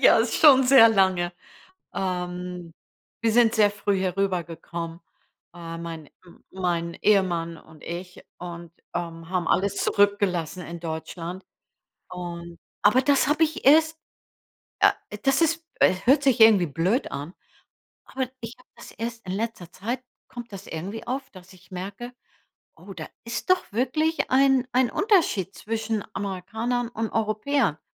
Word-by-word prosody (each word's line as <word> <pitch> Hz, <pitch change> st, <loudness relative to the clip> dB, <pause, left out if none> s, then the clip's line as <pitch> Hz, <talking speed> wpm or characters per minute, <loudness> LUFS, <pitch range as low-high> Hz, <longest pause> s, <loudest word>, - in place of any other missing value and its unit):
ja, -, -, +7 dB
ist 225 Hz, +1 st, +1 dB
schon 265 Hz, -4 st, +7 dB
sehr 250 Hz, -3 st, +8 dB
lange. 190 Hz, -4 st, +2 dB, 0.6 s
Ähm, 180 Hz, -2 st, -4 dB, 0.5 s
wir 230 Hz, -1 st, +2 dB
sind 235 Hz, -1 st, +4 dB
sehr 210 Hz, -2 st, +5 dB
früh 205 Hz, -1 st, -1 dB
herübergekommen. 170 Hz, -3 st, -3 dB, 0.5 s
Äh, 165 Hz, -1 st, -8 dB
mein 165 Hz, -2 st, -7 dB, 0.2 s
m 175 Hz, -, -18 dB
mein 170 Hz, -2 st, -2 dB
Ehemann 175 Hz, -5 st, +2 dB
und 160 Hz, -1 st, -17 dB
ich 180 Hz, +2 st, -7 dB
und, 170 Hz, -1 st, -8 dB, 0.2 s
ähm, 165 Hz, -1 st, -5 dB
haben 180 Hz, -2 st, -1 dB
alles 200 Hz, +2 st, +1 dB
zurückgelassen 190 Hz, -4 st, +1 dB
in 170 Hz, 0 st, -7 dB
Deutschland. 165 Hz, +2 st, -6 dB, 0.7 s
Und 170 Hz, -1 st, -7 dB, 0.2 s
aber 245 Hz, +6 st, +5 dB
das 280 Hz, 0 st, +3 dB
habe 305 Hz, +2 st, +4 dB
ich 315 Hz, 0 st, -5 dB
erst 315 Hz, +3 st, +5 dB, 0.8 s
äh, -, -, +6 dB, 0.3 s
das 270 Hz, +3 st, +3 dB
ist 330 Hz, 0 st, +1 dB
äh, -, -, +5 dB
hört 275 Hz, +4 st, +5 dB
sich 265 Hz, -4 st, +3 dB
irgendwie 215 Hz, -6 st, +7 dB
blöd 180 Hz, -, 0 dB
an, 145 Hz, +5 st, -6 dB, 0.7 s
aber 260 Hz, -2 st, -3 dB
ich 230 Hz, 0 st, -7 dB
habe 250 Hz, -, -23 dB
das -, -, -12 dB
erst 230 Hz, 0 st, -6 dB
in 185 Hz, -, -3 dB
letzter 200 Hz, -4 st, -4 dB
Zeit 240 Hz, +6 st, -4 dB, 0.3 s
kommt 240 Hz, -2 st, -9 dB
das 195 Hz, 0 st, -9 dB
irgendwie 190 Hz, +8 st, -6 dB
auf, 265 Hz, +1 st, -4 dB
dass 185 Hz, 0 st, -15 dB
ich 180 Hz, -1 st, -20 dB
merke, 200 Hz, +7 st, -7 dB, 0.6 s
oh, -, -, -11 dB
da -, -, -7 dB, 0.2 s
ist 230 Hz, +8 st, -5 dB
doch 370 Hz, -, +2 dB
wirklich 310 Hz, +8 st, 0 dB
ein 265 Hz, -1 st, +4 dB
ein 255 Hz, -1 st, +3 dB
Unterschied 335 Hz, -, +1 dB
zwischen 220 Hz, -1 st, -3 dB
Amerikanern 220 Hz, +5 st, -3 dB
und 225 Hz, -2 st, -4 dB
Europäern. 215 Hz, -, 0 dB
200 Hz, 145 wpm, -25 LUFS, 175-240 Hz, 0.8 s, sehr